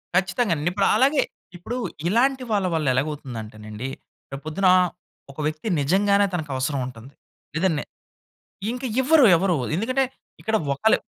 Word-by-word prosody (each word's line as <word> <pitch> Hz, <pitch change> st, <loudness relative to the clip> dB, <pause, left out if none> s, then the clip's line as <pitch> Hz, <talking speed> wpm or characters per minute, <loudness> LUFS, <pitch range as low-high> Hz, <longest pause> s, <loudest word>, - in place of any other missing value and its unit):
ఖచ్చితంగా 185 Hz, +2 st, +2 dB
అండి. 155 Hz, +3 st, 0 dB
ఇప్పుడు 195 Hz, +1 st, +2 dB
అలాగే, 275 Hz, +2 st, +4 dB, 0.4 s
ఇప్పుడు 225 Hz, +8 st, -5 dB, 0.3 s
ఇలాంటి 255 Hz, +6 st, +2 dB
వాళ్ళ 200 Hz, -3 st, +2 dB
వల్ల 155 Hz, -3 st, 0 dB
ఎలాగ 130 Hz, +4 st, +1 dB
అవుతుందంటేనండి, 110 Hz, -4 st, -7 dB, 0.4 s
రేపు 135 Hz, +1 st, -7 dB
పొద్దున 185 Hz, +5 st, +1 dB, 0.6 s
ఒక 140 Hz, -, -14 dB
వ్యక్తి 155 Hz, +6 st, -4 dB
నిజంగానే 200 Hz, +7 st, +3 dB
తనకు 160 Hz, -5 st, -3 dB
అవసరం 130 Hz, +2 st, -1 dB
ఉంటుంది. 125 Hz, +2 st, -11 dB, 0.4 s
లేదండి 165 Hz, -3 st, +1 dB, 0.9 s
ఇంకా 250 Hz, +2 st, -4 dB
ఇవ్వరు 290 Hz, +1 st, +6 dB
ఎవరు. 180 Hz, 0 st, +1 dB, 0.2 s
ఎందుకంటే 255 Hz, +8 st, +1 dB, 0.4 s
ఇక్కడ 220 Hz, 0 st, 0 dB, 0.2 s
ఒకళ్ళు... 220 Hz, +11 st, +3 dB
180 Hz, 135 wpm, -24 LUFS, 140-220 Hz, 0.9 s, ఇవ్వరు